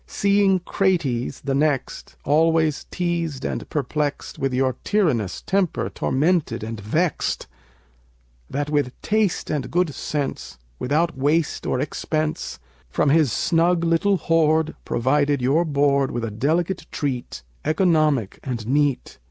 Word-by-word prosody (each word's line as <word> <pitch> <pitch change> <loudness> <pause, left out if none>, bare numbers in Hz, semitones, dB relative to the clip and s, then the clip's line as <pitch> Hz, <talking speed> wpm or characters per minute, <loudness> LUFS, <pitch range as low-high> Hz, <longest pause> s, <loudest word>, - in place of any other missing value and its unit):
Seeing 200 -1 +3
Crates, 170 -11 0
the 135 -1 -2
next, 145 -1 -1
always 160 0 +2
teased 170 -6 -2
and - - -4
perplexed, 145 0 -2
With 135 0 0
your 130 0 0
tyrannous 135 - 0
temper 190 -3 0
tormented 145 -5 0
and 110 0 -5
vexed; 155 - -1 1.0
That 145 +1 -2
with 145 -4 0
taste 215 -3 0
and 150 -4 -2
good 175 -4 +1
sense, 140 - -4 0.2
without 165 +5 +1
waste 150 +4 0
or 125 - 0
expense, 155 +2 -2 0.3
From 140 - +2
his 155 -5 +4
snug 170 - +2
little 170 +4 +2
hoard, 160 -1 +2
provided 140 +3 +1
your 135 +7 +2
board 140 -2 +2
With 120 - -3
a 110 - -4
delicate 165 - -1
treat, 125 - -3 0.2
economic 155 - +2
and 120 -5 -4
neat. 140 +1 0
150 Hz, 125 wpm, -23 LUFS, 135-165 Hz, 1.0 s, his